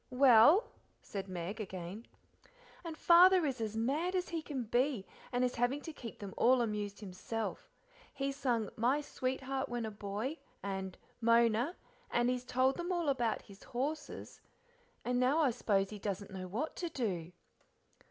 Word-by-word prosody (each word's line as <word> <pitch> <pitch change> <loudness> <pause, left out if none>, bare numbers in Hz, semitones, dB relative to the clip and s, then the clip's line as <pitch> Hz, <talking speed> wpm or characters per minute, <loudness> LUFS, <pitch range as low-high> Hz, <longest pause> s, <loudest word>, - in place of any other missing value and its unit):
"Well?" 275 - +6 0.3
said 195 -1 -6
Meg 185 +4 -4
again. 190 +2 -7 0.8
"And 330 -2 -6
Father 355 +1 +7
is 260 -4 -2
as 220 0 -2
mad 300 +11 0
as 365 -1 -1
he 330 -1 -2
can 280 -5 -4
be, 240 -1 +1 0.3
and 245 0 +1
is 250 0 +1
having 245 +4 +1
to 320 - -7
keep 235 -6 -8
them 200 -2 -7
all 250 0 +5
amused 210 -2 -3
himself. 210 +3 -5 0.4
He's 275 -1 -2
sung 240 -7 0
'My 255 +6 +2
sweetheart 265 -1 -3
when 240 -1 -2
a 220 - -4
boy' 210 +8 -4 0.2
and 190 -1 -4 0.2
'Mona,' 235 - +3 0.3
and 240 +1 +2
he's 250 0 -3
told 260 +2 +2
them 350 +1 -3
all 345 -4 0
about 245 -5 0
his 200 -1 -15
horses, 285 +6 -4 0.6
and 245 0 +1
now 255 +4 +3
I 270 - +4
s'pose 200 -4 +1
he 210 - -7
doesn't 200 0 -4
know 185 -1 -6
what 235 - -3
to 345 - -2
do." 185 - -3
245 Hz, 160 wpm, -34 LUFS, 210-275 Hz, 0.8 s, Father